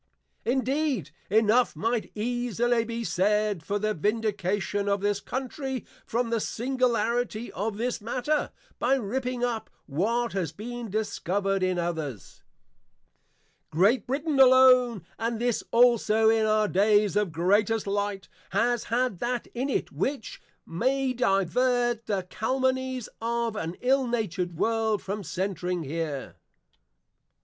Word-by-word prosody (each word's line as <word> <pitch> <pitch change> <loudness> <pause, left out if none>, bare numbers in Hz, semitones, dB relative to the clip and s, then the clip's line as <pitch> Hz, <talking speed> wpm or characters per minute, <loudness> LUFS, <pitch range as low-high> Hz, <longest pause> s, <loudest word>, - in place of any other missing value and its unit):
Indeed, 265 - 0 0.2
enough 220 +4 +3
might 230 0 -1
easily 240 +1 0
be 230 0 -4
said 205 +1 +1
for 200 +5 -2
the 215 +1 0
vindication 205 0 -1
of 200 -1 +1
this 205 0 +1
Country 265 +1 -4 0.2
from 235 0 -1
the 230 - +1
Singularity 240 -1 -1
of 205 +2 -3
this 240 0 -2
matter, 255 +7 -1 0.3
by 265 +2 +3
ripping 250 +1 -2
up, 235 -3 -2 0.2
what 230 +11 0
has 180 -6 -1
been 235 +5 -6
discovered 195 -1 -1
in 185 -1 +1
others. 160 - -4 1.3
Great 195 - +3
Brittain 280 +2 -1
alone, 255 -5 +6
and 230 0 -1
this 240 -1 0
also 230 -2 +4
in 220 -1 +2
our 215 0 +3
days 205 +1 +3
of 205 -4 +1
Greatest 205 +7 +2
Light, 200 -1 -2 0.3
has 240 0 +1
had 240 -5 0
that 240 0 -2
in 255 +4 -2
it, - - -1
which 270 -5 -3 0.2
may 260 +8 0
divert 240 +2 +1
the 200 -3 -1
Calumnies 260 +2 -1
of 235 -1 -1
an 170 -4 -4
ill 265 +1 +2
natured 180 -7 -2
World, 220 +1 +1
from 205 +2 -4
centring 180 0 -2
here. 150 -2 -4
225 Hz, 125 wpm, -27 LUFS, 200-245 Hz, 1.3 s, alone